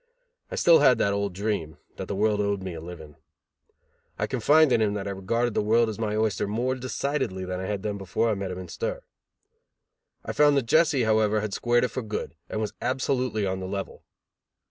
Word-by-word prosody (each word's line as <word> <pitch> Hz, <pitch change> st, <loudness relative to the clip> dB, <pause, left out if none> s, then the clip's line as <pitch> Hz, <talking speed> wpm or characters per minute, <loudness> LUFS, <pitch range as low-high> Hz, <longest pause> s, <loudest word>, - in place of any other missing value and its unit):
I -, -, -5 dB
still 170 Hz, -, +6 dB
had 130 Hz, -4 st, +5 dB
that 100 Hz, -2 st, +1 dB
old 100 Hz, 0 st, -1 dB
dream, 100 Hz, -6 st, -2 dB, 0.2 s
that -, -, -5 dB
the 100 Hz, -, -3 dB
world 105 Hz, +1 st, +2 dB
owed 100 Hz, -2 st, -1 dB
me 95 Hz, -2 st, -5 dB
a 80 Hz, -, -7 dB
living. 80 Hz, -3 st, -10 dB, 1.0 s
I -, -, 0 dB
confided 145 Hz, +4 st, +4 dB
in 115 Hz, -, +3 dB
him 105 Hz, -2 st, +2 dB
that 100 Hz, -1 st, -4 dB
I -, -, -2 dB
regarded 115 Hz, +5 st, -1 dB
the -, -, +1 dB
world 115 Hz, +2 st, +3 dB
as 110 Hz, -, -6 dB
my 105 Hz, -2 st, -1 dB
oyster 110 Hz, -2 st, 0 dB
more 120 Hz, +5 st, -1 dB
decidedly 130 Hz, -6 st, -2 dB
than 90 Hz, 0 st, -4 dB
I 95 Hz, -, -4 dB
had 100 Hz, -2 st, -3 dB
done 105 Hz, -1 st, -3 dB
before 95 Hz, +4 st, -1 dB
I 110 Hz, -, +2 dB
met 100 Hz, -2 st, -4 dB
him 90 Hz, -, -5 dB
in 95 Hz, -, -7 dB
stir. -, -, -4 dB, 1.2 s
I -, -, -3 dB
found 145 Hz, -1 st, +4 dB
that 135 Hz, -, +1 dB
Jesse, 150 Hz, -1 st, +3 dB
however, 110 Hz, -1 st, +2 dB
had 105 Hz, -2 st, -4 dB
squared 120 Hz, +2 st, +2 dB
it 125 Hz, -, +1 dB
for 130 Hz, -, -4 dB
good 110 Hz, -2 st, -5 dB, 0.2 s
and 110 Hz, -, -3 dB
was 110 Hz, -, -3 dB
absolutely 130 Hz, -3 st, 0 dB
on 95 Hz, 0 st, -2 dB
the 95 Hz, -, -5 dB
level. 100 Hz, 0 st, -5 dB
110 Hz, 215 wpm, -26 LUFS, 100-125 Hz, 1.2 s, still